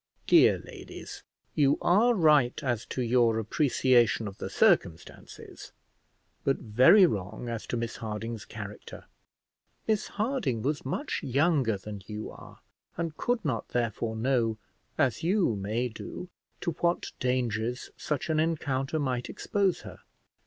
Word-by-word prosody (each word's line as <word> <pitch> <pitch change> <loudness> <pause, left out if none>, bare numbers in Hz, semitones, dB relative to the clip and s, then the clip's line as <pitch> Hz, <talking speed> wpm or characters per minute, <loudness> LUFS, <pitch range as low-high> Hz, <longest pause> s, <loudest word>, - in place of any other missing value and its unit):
Dear - - +6
ladies, - - -10 0.3
you 140 -2 +3
are 230 +7 +4
right 150 - +4
as 120 -4 -1
to 130 - -2
your 120 -1 +3
appreciation 120 -1 +2
of 100 - -9
the - - -4
circumstances, 80 -1 -1 0.7
but 135 - +1
very 130 - +6
wrong 100 - -3
as 115 -2 -5
to 120 - -2
Miss 115 0 -4
Harding's 110 0 -5
character. 105 -1 -9 0.8
Miss 215 -2 +1
Harding 205 - -1
was 145 +1 -1
much 210 - -3
younger 135 - +2
than 100 +1 -8
you 105 0 -6
are, - - -14 0.4
and 165 -2 -3
could 240 0 -1
not, 130 -7 -2
therefore, 115 -1 -2
know, 115 -2 +1 0.4
as 130 -1 +1
you 175 - +2
may 110 +5 -1
do, 125 +9 -8 0.3
to 170 - -1
what 170 0 0
dangers 125 -1 -1
such 150 -3 -3
an 155 - +1
encounter 150 -3 -1
might 130 -4 -2
expose 195 -3 0
her. - - -11
125 Hz, 135 wpm, -28 LUFS, 110-155 Hz, 0.8 s, Dear